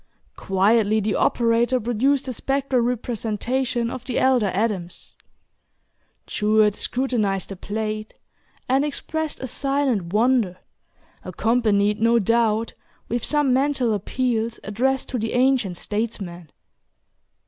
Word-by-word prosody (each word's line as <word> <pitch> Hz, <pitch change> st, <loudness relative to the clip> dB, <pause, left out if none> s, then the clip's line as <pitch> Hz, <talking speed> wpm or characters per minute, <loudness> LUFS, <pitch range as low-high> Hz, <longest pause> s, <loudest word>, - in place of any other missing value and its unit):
Quietly 210 Hz, +3 st, +2 dB
the 210 Hz, 0 st, -1 dB
operator 235 Hz, +2 st, +2 dB
produced 250 Hz, +5 st, +1 dB
the 255 Hz, -, -4 dB
spectral 270 Hz, 0 st, 0 dB
representation 240 Hz, +1 st, -1 dB
of 255 Hz, -, -6 dB
the 255 Hz, -3 st, -3 dB
elder 255 Hz, -5 st, +3 dB
Adams. 190 Hz, -2 st, -3 dB, 1.1 s
Jewett 210 Hz, 0 st, +2 dB
scrutinized 220 Hz, -6 st, -1 dB
the 195 Hz, -, -6 dB
plate, 215 Hz, +2 st, -4 dB, 0.5 s
and 265 Hz, +2 st, +2 dB
expressed 310 Hz, +1 st, -3 dB
a -, -, -3 dB
silent 260 Hz, -8 st, -1 dB
wonder, 220 Hz, -4 st, +2 dB, 0.7 s
accompanied, 215 Hz, -3 st, +1 dB
no 230 Hz, +1 st, +4 dB
doubt, 230 Hz, 0 st, +1 dB, 0.4 s
with 240 Hz, 0 st, -2 dB
some 295 Hz, -4 st, +2 dB
mental 265 Hz, -3 st, +1 dB
appeals 230 Hz, +2 st, -1 dB
addressed 255 Hz, +6 st, -1 dB
to 250 Hz, -, -2 dB
the 220 Hz, +1 st, -2 dB
ancient 245 Hz, -8 st, +2 dB
statesman. 195 Hz, -7 st, -4 dB
230 Hz, 110 wpm, -23 LUFS, 210-255 Hz, 1.1 s, no